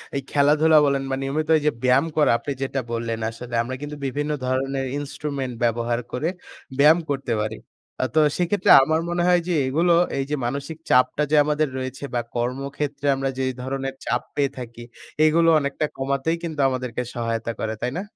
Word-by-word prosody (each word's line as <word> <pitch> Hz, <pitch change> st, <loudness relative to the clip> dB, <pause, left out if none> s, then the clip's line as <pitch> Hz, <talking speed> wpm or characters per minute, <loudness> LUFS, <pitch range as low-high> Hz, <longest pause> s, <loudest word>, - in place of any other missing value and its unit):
এই 140 Hz, -, 0 dB
খেলাধুলা 150 Hz, +2 st, +4 dB
বলেন 140 Hz, -1 st, +1 dB
বা 135 Hz, -, 0 dB
নিয়মিত 150 Hz, +3 st, -2 dB
এই -, -, -3 dB
যে -, -, +4 dB
ব্যায়াম 130 Hz, +3 st, +4 dB
করা 150 Hz, -, +4 dB
আপনি 140 Hz, +4 st, -5 dB
যেটা 135 Hz, 0 st, -1 dB
বললেন 115 Hz, -1 st, -2 dB
আসলে 120 Hz, +1 st, -10 dB
আমরা 130 Hz, +2 st, -5 dB
কিন্তু 150 Hz, 0 st, -6 dB
বিভিন্ন 145 Hz, +3 st, -2 dB
ধরনের 135 Hz, +1 st, -1 dB
ইন্সট্রুমেন্ট 140 Hz, -2 st, -4 dB
ব্যবহার 120 Hz, +1 st, +1 dB
করে 150 Hz, +7 st, -1 dB, 0.5 s
ব্যায়াম 155 Hz, +4 st, +6 dB
করতে 135 Hz, -3 st, -1 dB
পারি। 110 Hz, +1 st, -3 dB, 0.5 s
আ -, -, +2 dB
তো -, -, +6 dB, 0.2 s
সেক্ষেত্রে 180 Hz, +2 st, +2 dB
আমার 160 Hz, +3 st, +1 dB
মনে 175 Hz, 0 st, 0 dB
হয় 180 Hz, -1 st, +5 dB
যে 180 Hz, -, 0 dB
এগুলো 170 Hz, +6 st, +2 dB, 0.2 s
এই 135 Hz, -, 0 dB
যে 150 Hz, -, 0 dB
মানসিক 140 Hz, +5 st, -4 dB
চাপটা 130 Hz, +4 st, +3 dB
যে -, -, +4 dB
আমাদের 150 Hz, 0 st, +1 dB
রয়েছে 130 Hz, +1 st, -5 dB
বা 120 Hz, -, +1 dB
কর্মক্ষেত্রে 140 Hz, +4 st, -3 dB
আমরা 135 Hz, 0 st, -1 dB
যেই 130 Hz, 0 st, 0 dB
ধরনের 135 Hz, +1 st, -3 dB
চাপ -, -, 0 dB
পেয়ে 140 Hz, -2 st, +1 dB
থাকি, 120 Hz, -1 st, -8 dB, 0.4 s
এগুলো 165 Hz, +2 st, +4 dB
অনেকটা 140 Hz, +2 st, -1 dB
কমাতেই 140 Hz, +5 st, -1 dB
কিন্তু 160 Hz, -3 st, -5 dB
আমাদেরকে 125 Hz, -2 st, -3 dB
সহায়তা 115 Hz, -1 st, -2 dB
করে 110 Hz, 0 st, -2 dB
তাই 125 Hz, -, -1 dB
না? 185 Hz, -, -2 dB
135 Hz, 180 wpm, -23 LUFS, 125-150 Hz, 0.5 s, ব্যায়াম